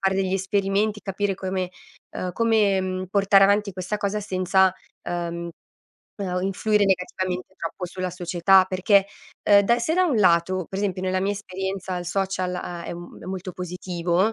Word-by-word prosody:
fare 190 Hz, -1 st, +1 dB
degli 190 Hz, -1 st, 0 dB
esperimenti, 200 Hz, +2 st, 0 dB
capire 195 Hz, 0 st, -1 dB
come 185 Hz, -1 st, -3 dB, 0.5 s
uhm, 180 Hz, -1 st, -3 dB
come, 215 Hz, -3 st, +3 dB
mhmm, 185 Hz, 0 st, -3 dB
portare 195 Hz, -1 st, +5 dB
avanti 200 Hz, +1 st, +2 dB
questa 185 Hz, +3 st, -3 dB
cosa 205 Hz, +1 st, -1 dB
senza, 190 Hz, -1 st, +2 dB, 0.3 s
uhm 170 Hz, 0 st, -3 dB, 0.7 s
uhm, 180 Hz, -1 st, -2 dB
influire 205 Hz, +2 st, +1 dB
negativamente 185 Hz, 0 st, -1 dB
troppo 170 Hz, +2 st, -5 dB
sulla 185 Hz, +1 st, -4 dB
società 180 Hz, +1 st, +4 dB
perché, 190 Hz, +1 st, +3 dB, 0.4 s
uhm, 205 Hz, -1 st, +8 dB
da 235 Hz, +4 st, +3 dB
se 315 Hz, +7 st, 0 dB
da 370 Hz, +1 st, +4 dB
un 305 Hz, -9 st, +1 dB
lato, 185 Hz, -2 st, +3 dB
per 195 Hz, -, -5 dB
esempio 190 Hz, -3 st, -1 dB
nella 185 Hz, 0 st, 0 dB
mia 195 Hz, -, 0 dB
esperienza 190 Hz, -1 st, -4 dB
il 175 Hz, -1 st, -5 dB
social 185 Hz, -1 st, -1 dB
ha 175 Hz, -1 st, -5 dB
è -, -, -5 dB
un 175 Hz, 0 st, -9 dB
è -, -, -10 dB
molto 185 Hz, 0 st, -5 dB
positivo, 180 Hz, +2 st, -1 dB
190 Hz, 170 wpm, -24 LUFS, 180-200 Hz, 0.7 s, uhm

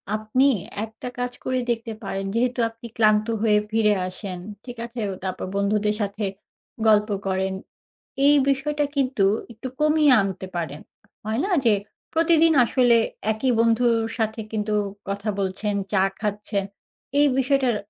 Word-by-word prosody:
আপনি 215 Hz, +5 st, +1 dB, 0.4 s
একটা 225 Hz, +2 st, -9 dB
কাজ 245 Hz, 0 st, -1 dB
করে 255 Hz, 0 st, 0 dB
দেখতে 230 Hz, -1 st, -3 dB
পারেন, 195 Hz, 0 st, -3 dB
যেহেতু 245 Hz, +2 st, +1 dB
আপনি 230 Hz, +1 st, -11 dB
ক্লান্ত 215 Hz, -1 st, +4 dB, 0.2 s
হয়ে 215 Hz, -2 st, +4 dB
ফিরে 215 Hz, -1 st, +3 dB
আসেন, 185 Hz, 0 st, -6 dB, 0.3 s
ঠিক 245 Hz, -1 st, -8 dB
আছে? 235 Hz, +1 st, -8 dB
ও -, -, -4 dB
তারপর 185 Hz, -1 st, -3 dB
বন্ধুদের 210 Hz, +1 st, +1 dB
সাথে 205 Hz, +1 st, -3 dB, 0.6 s
গল্প 210 Hz, 0 st, +4 dB, 0.2 s
করেন। 190 Hz, 0 st, 0 dB, 0.7 s
এই 290 Hz, -, +7 dB
বিষয়টা 295 Hz, +2 st, 0 dB
কিন্তু 260 Hz, -7 st, +2 dB, 0.3 s
একটু 230 Hz, +4 st, -7 dB
কমিয়ে 305 Hz, -1 st, +4 dB
আনতে 190 Hz, -1 st, -4 dB
পারেন। 160 Hz, -3 st, -4 dB, 0.4 s
হয়না 230 Hz, -, -1 dB, 0.2 s
যে, 225 Hz, -, +6 dB, 0.4 s
প্রতিদিন 330 Hz, 0 st, +4 dB
আসলে 245 Hz, -1 st, +4 dB, 0.3 s
একই 235 Hz, +4 st, 0 dB
বন্ধুর 230 Hz, +1 st, +3 dB, 0.2 s
সাথে 220 Hz, -1 st, -1 dB
কিন্তু 215 Hz, -1 st, -1 dB, 0.4 s
কথা 200 Hz, +2 st, -2 dB
বলছেন, 200 Hz, +2 st, -1 dB, 0.2 s
চা 190 Hz, -2 st, +4 dB, 0.2 s
খাচ্ছেন। 205 Hz, -1 st, -2 dB, 0.5 s
এই 290 Hz, -, +6 dB
বিষয়টার 265 Hz, -2 st, +2 dB
220 Hz, 135 wpm, -24 LUFS, 205-255 Hz, 0.7 s, এই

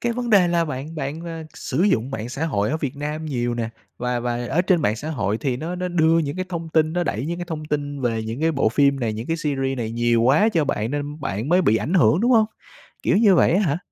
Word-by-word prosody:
cái 240 Hz, 0 st, 0 dB
vấn 240 Hz, 0 st, -3 dB
đề 190 Hz, -5 st, +5 dB
là 170 Hz, -1 st, +2 dB
bạn 150 Hz, +2 st, -6 dB
bạn, 150 Hz, +1 st, -4 dB
ờ, 165 Hz, -1 st, -6 dB
sử 150 Hz, +6 st, -2 dB
dụng 135 Hz, -, +2 dB
mạng 115 Hz, -3 st, -4 dB
xã 145 Hz, +6 st, -3 dB
hội 105 Hz, -5 st, 0 dB
ở 155 Hz, -, 0 dB
Việt 140 Hz, -3 st, -4 dB
Nam 150 Hz, +2 st, -4 dB
nhiều 120 Hz, -4 st, -1 dB
nè, 115 Hz, -1 st, -2 dB, 0.3 s
và 125 Hz, 0 st, -1 dB
và 120 Hz, 0 st, -2 dB
ở 175 Hz, -, +2 dB
trên 175 Hz, -4 st, +2 dB
mạng 105 Hz, +2 st, +1 dB
xã 150 Hz, +7 st, -5 dB
hội 110 Hz, -6 st, -1 dB
thì 130 Hz, -4 st, -1 dB
nó 165 Hz, +6 st, -4 dB
nó 180 Hz, 0 st, -3 dB
đưa 165 Hz, -1 st, +3 dB
những 145 Hz, 0 st, -2 dB
cái 185 Hz, -, -2 dB
thông 170 Hz, -2 st, -5 dB
tin, 155 Hz, 0 st, +2 dB
nó 175 Hz, 0 st, 0 dB
đẩy 125 Hz, +1 st, -2 dB
những 170 Hz, +1 st, -3 dB
cái 175 Hz, -, -4 dB
thông 155 Hz, -2 st, -4 dB
tin 145 Hz, -2 st, -3 dB
về 115 Hz, -3 st, -1 dB
những 115 Hz, +6 st, -5 dB
cái 165 Hz, 0 st, +2 dB
bộ 135 Hz, -6 st, +2 dB
phim 140 Hz, +3 st, +2 dB
này, 115 Hz, -3 st, -1 dB
những 110 Hz, +3 st, -6 dB
cái 165 Hz, -, -1 dB
series 135 Hz, -4 st, -2 dB
này 110 Hz, -1 st, -3 dB
nhiều 120 Hz, 0 st, +2 dB
quá 145 Hz, -, +4 dB
cho 160 Hz, -3 st, +2 dB
bạn 115 Hz, -4 st, -2 dB
nên 145 Hz, +1 st, -4 dB
bạn 115 Hz, 0 st, -3 dB
mới 180 Hz, +2 st, +4 dB
bị 110 Hz, -7 st, +3 dB
ảnh 160 Hz, +10 st, -2 dB
hưởng, 175 Hz, 0 st, +4 dB
đúng 240 Hz, -, +2 dB
hông? 220 Hz, -2 st, +5 dB, 0.6 s
Kiểu -, -, +2 dB
như 205 Hz, -3 st, +5 dB
vậy -, -, +4 dB
á 195 Hz, -, +3 dB
hả? 160 Hz, -3 st, 0 dB
150 Hz, 280 wpm, -22 LUFS, 120-165 Hz, 0.6 s, đề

